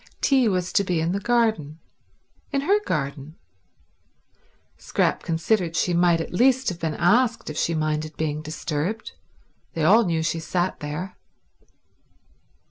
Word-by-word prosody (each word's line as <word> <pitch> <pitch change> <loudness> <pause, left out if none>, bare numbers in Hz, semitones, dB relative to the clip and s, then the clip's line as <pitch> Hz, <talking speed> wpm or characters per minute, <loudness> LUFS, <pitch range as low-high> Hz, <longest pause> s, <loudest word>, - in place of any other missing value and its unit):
Tea 265 -4 +3
was 185 -3 -1
to 200 - +3
be 180 -3 -1
in 165 +2 0
the 195 - -1
garden, 220 -10 0 0.7
in 275 -1 0
her 400 +9 +3
garden. 145 0 -3 1.4
Scrap - - 0
considered 170 +1 0
she 180 - +1
might 170 -1 +3
at 165 - -5
least 260 +6 +3
have 175 -2 -6
been 160 -3 -2
asked 230 +1 +2
if 150 - -8
she 165 - 0
minded 155 0 -2
being 155 -1 -2
disturbed. 155 +6 -4 0.6
They 160 - -1
all 215 +9 +6
knew 165 -4 -1
she 165 +1 -1
sat 175 +3 -2
there. 150 +6 -6
170 Hz, 140 wpm, -24 LUFS, 155-215 Hz, 1.4 s, all